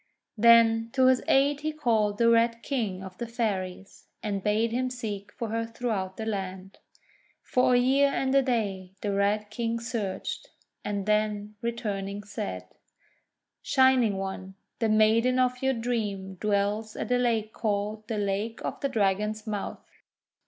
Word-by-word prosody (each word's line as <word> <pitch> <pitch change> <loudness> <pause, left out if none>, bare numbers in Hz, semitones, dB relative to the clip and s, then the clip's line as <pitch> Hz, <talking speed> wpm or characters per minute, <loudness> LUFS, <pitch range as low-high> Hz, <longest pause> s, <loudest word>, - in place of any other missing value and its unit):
Then 230 0 +5
to 260 -1 +4
his 255 -1 +5
aid 280 +1 +3
he 310 +1 -2
called 225 -9 +1
the 235 - +3
Red 230 0 +3
King 210 -9 -2
of 190 -1 -10
the 235 - -3
Fairies, 195 -5 -4 0.2
and 200 -2 -2
bade 215 +3 +1
him 255 +2 0
seek 210 -5 -5
for 230 - -4
her 230 +1 -1
throughout 225 -5 -3
the 220 - -4
land. 190 -2 -5 0.6
For 250 -1 +3
a - - +6
year 265 +3 +4
and 270 -1 0
a 275 - +6
day 200 -7 -2
the 205 -1 -1
Red 205 +1 0
King 230 0 -2
searched, 225 -5 -4 0.3
and 200 -2 -3
then, 210 -1 0
returning, 205 -4 -3
said: 95 - -5 0.5
— - - -53
"Shining 260 -6 +3
One, 190 0 -5 0.2
the 225 -1 +1
maiden 220 +4 +4
of 250 0 +1
your 265 0 +2
dream 210 -5 -2
dwells 210 +2 -1
at - - -4
a 250 - +3
lake 225 -3 0
called 210 0 -2
the 225 -2 -2
Lake 205 +3 -2
of - - -4
the 275 - -1
Dragon's 210 -1 0
Mouth. 210 -2 -5
220 Hz, 160 wpm, -27 LUFS, 200-235 Hz, 0.6 s, a